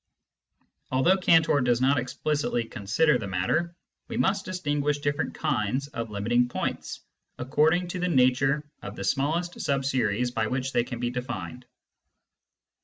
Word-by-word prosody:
Although 130 +9 +4
Cantor 165 -5 +4
does 120 -1 +2
not 135 +2 +3
explicitly 140 0 -1
consider 125 +7 +1
the 105 - -5
matter, 130 - -1 0.3
we 230 - -5
must 200 -4 +1
distinguish 145 -5 -1
different 145 +1 -2
kinds 135 -2 -1
of 115 -6 -5
limiting 120 +4 +1
points - - -4 0.4
according 155 +7 +2
to 180 - -4
the 180 - 0
nature 135 +1 +2
of - - -7
the - - -6
smallest 165 +6 -1
sub 140 -4 0
series 125 -2 0
by 110 -2 -1
which 130 +3 -2
they 120 - +3
can 120 -1 -6
be 120 0 -1
defined. 125 0 -6
135 Hz, 145 wpm, -26 LUFS, 125-155 Hz, 0.4 s, Although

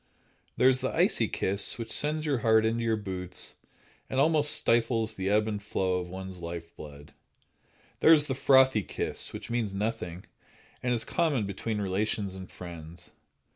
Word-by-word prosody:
There 125 - +5
is 130 0 +3
the 130 - 0
icy - - +2
kiss, 100 +1 +1
which 115 -1 -6
sends 155 +1 +1
your 140 -5 0
heart 110 -2 +4
into 115 +1 0
your 115 -1 +1
boots 95 -3 -5 0.6
and 130 - -1
almost 150 0 +4
stifles 115 -3 +2
the 95 -1 -2
ebb 105 +1 +2
and 105 -2 -3
flow 95 -3 -1
of 90 0 -6
one's 95 0 -7
life 85 0 -7
blood. 75 -1 -12 0.9
There 160 - +6
is 150 -2 +7
the 135 - -2
frothy 130 -3 +4
kiss, - - -3
which - - -8
means 115 -5 -1
nothing, 100 -4 -3 0.6
and 125 - -1
is 115 -2 0
common 145 -10 0
between 105 +2 -3
relations 100 0 -1
and 95 -1 -9
friends. 85 -1 -10
110 Hz, 170 wpm, -28 LUFS, 95-125 Hz, 0.9 s, is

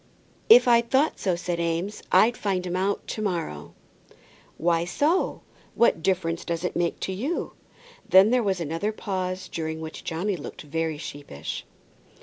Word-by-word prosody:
"If 460 - +9
I 235 -1 +6
thought 265 +6 +1
so," 185 -3 +1
said 175 0 -3
Eames, 170 +5 -2
"I'd 235 +2 +5
find 190 -4 -1
him 180 0 -3
out 195 +2 -1
to 215 - -3
morrow." 165 - -3 0.8
"Why 170 0 +2
so? 300 - 0 0.3
what 235 -8 +3
difference 170 -2 0
does 170 0 -3
it 180 - -2
make 170 -1 0
to - - -2
you?" 265 - -3 0.6
Then 190 +4 +7
there 250 0 +4
was 195 -4 0
another 165 +6 -2
pause, 185 -3 -3
during 160 -1 -4
which 160 0 -7
Johnny 180 +5 -2
looked 150 - -8
very 160 +1 -2
sheepish. 145 - -7
180 Hz, 155 wpm, -25 LUFS, 165-210 Hz, 0.8 s, If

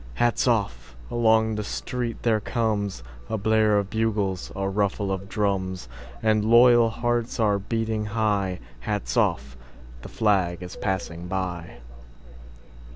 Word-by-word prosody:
Hats 120 +1 +1
off! 100 - -1 0.2
Along 110 -1 +3
the 105 0 -3
street 120 +2 -4
there 110 -2 +3
comesA 105 - -1 0.3
blare 110 0 +3
of 100 -1 -1
bugles, 105 -4 -1
a 95 0 -1
ruffle 100 0 0
of 95 0 -4
drums; 95 -3 -1 0.4
And 110 -1 +3
loyal 120 +1 +6
hearts 120 +1 -1
are 105 -3 +2
beating 110 +1 -2
high:Hats 95 - -2
off! 65 0 +1 0.5
The - - -9
flag 95 -5 +1
is 90 - -8
passing 90 -3 -3
by! 90 -7 -4
105 Hz, 120 wpm, -25 LUFS, 95-110 Hz, 0.5 s, loyal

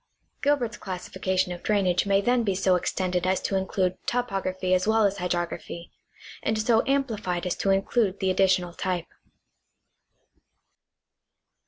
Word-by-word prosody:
Gilbert's 275 -5 +1
classification 185 0 -2
of 175 - -6
drainage 195 -3 +1
may 195 0 +3
then 245 +2 +2
bo 200 -3 0
so 185 0 +2
extended 180 0 -1
as 190 0 +2
to 195 - -2
include 190 -1 0
topography 195 -6 -1
as 185 +2 +2
well 220 -1 +4
as 200 0 +1
hydrography, 175 -1 -3 0.5
and 220 - 0
so 225 +1 +3
amplified 220 -11 -1
as 180 - -1
to 195 - -1
include 195 +1 +1
the 190 -1 +1
additional 185 -2 +2
type. 180 -2 -2
190 Hz, 135 wpm, -26 LUFS, 180-215 Hz, 0.5 s, well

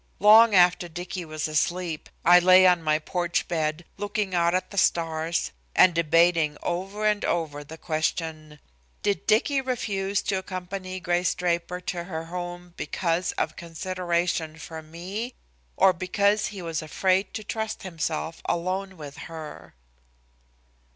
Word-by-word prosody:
Long 215 +1 +7
after 180 -1 +5
Dicky 175 +1 -6
was 155 -1 -3
asleep, 165 +1 -1 0.2
I 175 +1 +8
lay 185 +1 +7
on 180 -2 +5
my 155 -1 +2
porch 175 +2 -2
bed 160 0 -2
looking 205 -2 -2
out 170 0 +2
at 185 0 -2
the 200 - -9
stars 165 -1 0 0.2
and 185 - +6
debating 165 -1 +3
over 195 +5 -3
and 210 -1 +2
over 150 -4 -1
the 160 +3 -11
question: 155 -1 -3 0.5
"Did 200 -1 -1
Dicky 260 +6 +3
refuse 205 -6 -1
to 195 - 0
accompany 185 0 -6
Grace 175 0 0
Draper 175 0 -1
to 175 -2 -4
her 165 -3 -5
home 175 0 -6
because 170 0 -1
of 160 - -2
consideration 170 -1 -2
for 160 0 -8
me, 185 +10 -6 0.4
or 190 - +6
because 200 +4 +1
he 195 -3 -7
was 165 -1 -3
afraid 185 +5 +1
to 220 - -4
trust 220 +1 -4
himself 165 -2 -3
alone 185 +2 -2
with 145 -2 -9
her?" 160 - -9
175 Hz, 140 wpm, -26 LUFS, 165-190 Hz, 0.5 s, I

